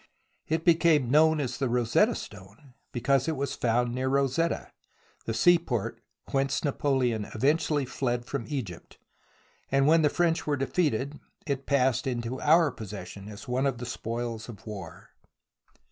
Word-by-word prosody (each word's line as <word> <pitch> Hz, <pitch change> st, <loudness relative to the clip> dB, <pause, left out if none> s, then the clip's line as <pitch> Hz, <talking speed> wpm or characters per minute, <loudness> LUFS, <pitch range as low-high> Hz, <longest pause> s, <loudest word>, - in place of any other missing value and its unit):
It 160 Hz, +1 st, -1 dB
became 165 Hz, -7 st, +4 dB
known 160 Hz, +1 st, +5 dB
as 135 Hz, -4 st, -3 dB
the 135 Hz, -3 st, 0 dB
Rosetta 120 Hz, -1 st, +2 dB
Stone 105 Hz, +9 st, -11 dB, 0.2 s
because 135 Hz, +3 st, +1 dB
it 160 Hz, -, 0 dB
was 140 Hz, 0 st, -2 dB
found 120 Hz, 0 st, +1 dB
near 130 Hz, +1 st, -1 dB
Rosetta, 140 Hz, +5 st, 0 dB, 0.5 s
the 115 Hz, -, -2 dB
seaport 165 Hz, -, +2 dB, 0.3 s
whence 135 Hz, 0 st, 0 dB
Napoleon 130 Hz, -6 st, 0 dB
eventually 145 Hz, +3 st, +1 dB
fled 125 Hz, -1 st, -2 dB
from 140 Hz, -3 st, -4 dB
Egypt, 115 Hz, -, -6 dB, 0.7 s
and 135 Hz, 0 st, +3 dB
when 160 Hz, +2 st, +5 dB
the 150 Hz, -, +4 dB
French 170 Hz, -1 st, 0 dB
were 145 Hz, -1 st, +1 dB
defeated 140 Hz, -1 st, -1 dB, 0.3 s
it 140 Hz, -3 st, -3 dB
passed 130 Hz, -1 st, +2 dB
into 120 Hz, 0 st, -3 dB
our 160 Hz, 0 st, +5 dB
possession 100 Hz, -2 st, -8 dB
as 105 Hz, 0 st, -10 dB
one 130 Hz, +3 st, +1 dB
of 135 Hz, -3 st, -1 dB
the 120 Hz, -, -6 dB
spoils 115 Hz, -1 st, -4 dB
of 110 Hz, -, -11 dB
war. 100 Hz, -7 st, -9 dB
130 Hz, 145 wpm, -28 LUFS, 120-145 Hz, 0.7 s, known